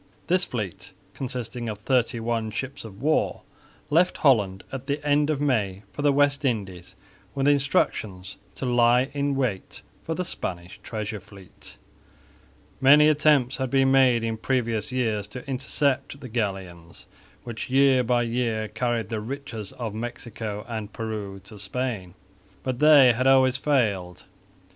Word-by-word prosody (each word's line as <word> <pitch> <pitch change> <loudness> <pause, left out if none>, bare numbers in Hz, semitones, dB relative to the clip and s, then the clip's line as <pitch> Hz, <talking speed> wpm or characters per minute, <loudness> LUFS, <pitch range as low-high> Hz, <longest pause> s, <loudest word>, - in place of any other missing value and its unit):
This 180 +1 +2
fleet, 105 -7 -5 0.2
consisting 125 -2 -4
of 105 - -4
thirty 120 +2 0
one 115 -1 -1
ships 130 +6 -5
of 110 +1 -11
war, 155 +1 +1 0.5
left 175 +4 +3
Holland 105 - +2
at 135 0 -6
the 145 +1 -1
end 145 +1 +3
of 150 -3 0
May 105 -9 0
for - - -5
the 145 0 +4
West 145 +1 +2
Indies 95 -8 -3 0.4
with 135 0 +1
instructions 105 -9 0 0.2
to - - -4
lie 120 +1 +3
in 140 -1 0
wait 125 -8 -3 0.2
for 165 - -3
the 180 - -2
Spanish 90 - -6
Treasure 110 -1 -5
Fleet. 95 0 -14 1.0
Many 150 +3 +7
attempts 150 -4 +3
had 130 -2 -2
been 135 0 +3
made 130 -3 +4
in 115 -1 -2
previous 115 +1 -1
years 110 -5 -1
to 125 +6 -9
intercept 140 +1 -1
the 130 - -9
galleons, 95 -7 -4 0.4
which 120 -1 -6
year 135 -1 +4
by 120 0 +2
year 115 -2 -1
carried 115 -1 -2
the 110 -2 -3
riches 115 -4 -6
of 115 -4 -5
Mexico 110 -2 -6
and 110 -3 -5
Peru 105 -3 -5
to 105 +1 -12
Spain, 100 -4 -3 0.5
but 130 -2 -3
they 145 -5 +7
had 130 +3 0
always 130 -1 +5
failed. 105 - 0
120 Hz, 150 wpm, -25 LUFS, 105-135 Hz, 1.0 s, Many